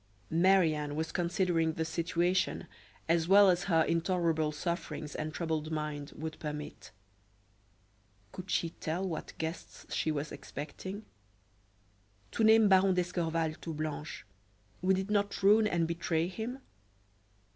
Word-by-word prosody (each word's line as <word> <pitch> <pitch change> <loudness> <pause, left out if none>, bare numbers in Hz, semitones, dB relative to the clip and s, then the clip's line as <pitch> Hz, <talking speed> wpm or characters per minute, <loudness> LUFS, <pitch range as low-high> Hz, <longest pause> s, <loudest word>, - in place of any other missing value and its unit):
Marie 175 0 +4
Anne 150 -1 -3
was 160 +1 -2
considering 175 -2 +1
the 160 +1 -2
situation 175 +2 0 0.4
as 165 0 +2
well 200 0 +7
as 175 +1 -1
her 165 -4 +4
intolerable 165 -2 +1
sufferings 155 -1 -4
and 155 0 -3
troubled 160 -1 -2
mind 150 -2 -3
would 160 0 -6
permit. 150 -1 -6 1.4
Could 185 0 -9
she 165 - 0
tell 175 +4 -3
what 165 - -6
guests 160 +2 -6
she - - 0
was 150 0 -2
expecting? 190 +8 -7 1.3
To - - 0
name 220 0 +7
Baron 190 -1 +5
d'Escorval 165 -3 0
to 165 -2 -5
Blanche, 155 0 -5 0.6
would 185 +1 +3
it 190 +2 -3
not 200 -1 0
ruin 210 +2 +6
and 170 -4 +1
betray 165 -1 0
him? 225 +7 -5
170 Hz, 130 wpm, -31 LUFS, 155-185 Hz, 1.4 s, well